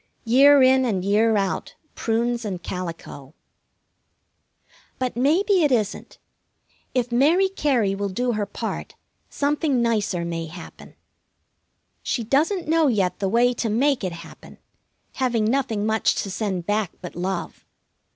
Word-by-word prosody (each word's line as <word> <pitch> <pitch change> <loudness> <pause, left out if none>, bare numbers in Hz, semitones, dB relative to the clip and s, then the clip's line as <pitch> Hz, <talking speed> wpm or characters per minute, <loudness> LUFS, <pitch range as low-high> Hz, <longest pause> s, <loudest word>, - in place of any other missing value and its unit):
Year 275 +4 +6
in 260 0 +5
and 195 -7 -1
year 215 +2 +3
out, 195 -1 -2 0.2
prunes 235 +1 -1
and 185 -5 -5
calico. 165 -5 -7 1.6
But 255 -1 -2
maybe 350 - +2
it 295 -3 +2
isn't. 215 -5 -2 0.8
If 250 -1 0
Mary 310 +10 +4
Cary 260 - +1
will 200 0 -3
do 245 +6 -1
her 210 -3 -2
part - - -6 0.3
something 285 -2 0
nicer 210 -7 0
may 165 -1 -4
happen. 170 +2 -12 1.1
She 235 - -2
doesn't 310 - 0
know 320 -1 +3
yet 200 -8 0
the 195 -1 -1
way 240 +4 +3
to 235 -1 -2
make 260 +3 +1
it 185 - -2
happen, - - -14 0.6
having 240 -5 +1
nothing 225 -3 0
much 220 0 +1
to 195 - -6
send 190 -3 -3
back 205 -2 -1
but 180 - -9
love. 180 +1 -4
230 Hz, 135 wpm, -23 LUFS, 195-265 Hz, 1.6 s, Year